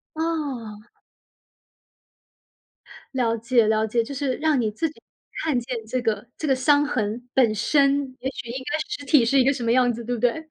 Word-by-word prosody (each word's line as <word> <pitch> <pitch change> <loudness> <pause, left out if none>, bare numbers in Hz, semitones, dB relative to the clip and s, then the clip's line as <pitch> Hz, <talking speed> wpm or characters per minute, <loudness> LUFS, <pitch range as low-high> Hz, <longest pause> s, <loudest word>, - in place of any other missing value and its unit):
哦。 270 -10 -3 2.3
了 230 -3 +1
解， 235 0 +2
了 220 0 +2
解， 230 +2 +1
就 255 - -7
是 275 -1 -1
让 305 -3 +1
你 225 -3 +1
自 315 +10 -2
己 305 - -18 0.4
看 305 -6 +1
见 240 -2 -5
这 250 +3 -2
个 220 -2 -2
这 310 - -3
个 270 - +3
伤 285 +3 +3
痕 240 -3 -2
本 240 -5 +4
身， 275 +2 +2
也 265 - -2
许 240 - -8
应 260 +2 -5
该 305 - +1
实 415 -9 -5
体 275 -2 +5
是 270 +4 +3
一 - - +5
个 275 - +4
什 255 -3 -5
么 230 - +1
样 250 0 +4
子， 235 0 -6
对 245 +2 -2
不 - - -5
对？ 280 +7 0
255 Hz, 210 characters per minute, -24 LUFS, 230-285 Hz, 2.3 s, 体